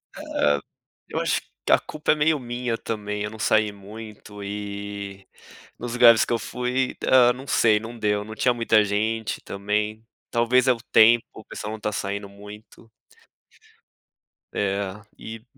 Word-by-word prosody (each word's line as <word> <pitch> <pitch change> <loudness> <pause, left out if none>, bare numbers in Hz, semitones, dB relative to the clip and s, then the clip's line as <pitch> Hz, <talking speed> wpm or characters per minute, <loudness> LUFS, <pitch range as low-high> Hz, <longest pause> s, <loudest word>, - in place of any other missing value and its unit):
É. 75 -1 +1 0.5
Eu - - -3
acho - - +1 0.2
que - - 0
a - - +8
culpa 155 - -1
é - - -1
meio 150 0 +2
minha 120 -1 -3
também, 105 -2 -4
eu 105 - -3
não 110 - -10
saí 110 0 +2
muito 105 0 -10
e, 100 -1 -6 0.5
nos 120 0 -5
lugares 120 -2 +7
que - - -1
eu 115 - +1
fui 125 +4 -2
Ah, 125 -2 +6
não 130 +2 -7
sei, 110 -5 +3
não 115 +2 -8
deu, 105 -2 0
não 110 - -8
tinha 125 +3 +2
muita 115 -2 +3
gente 110 +2 -1
também, 105 +2 -2 0.3
talvez 125 +2 +3
é 130 - +6
o - - -7
tempo, 115 +1 +6
o 110 - -12
pessoal 105 - -6
não 110 - -7
tá 105 - -2
saindo 100 0 -3
muito. 105 +3 -13 1.7
É, 100 0 0 0.3
e 110 0 -9
110 Hz, 160 wpm, -24 LUFS, 105-120 Hz, 1.7 s, a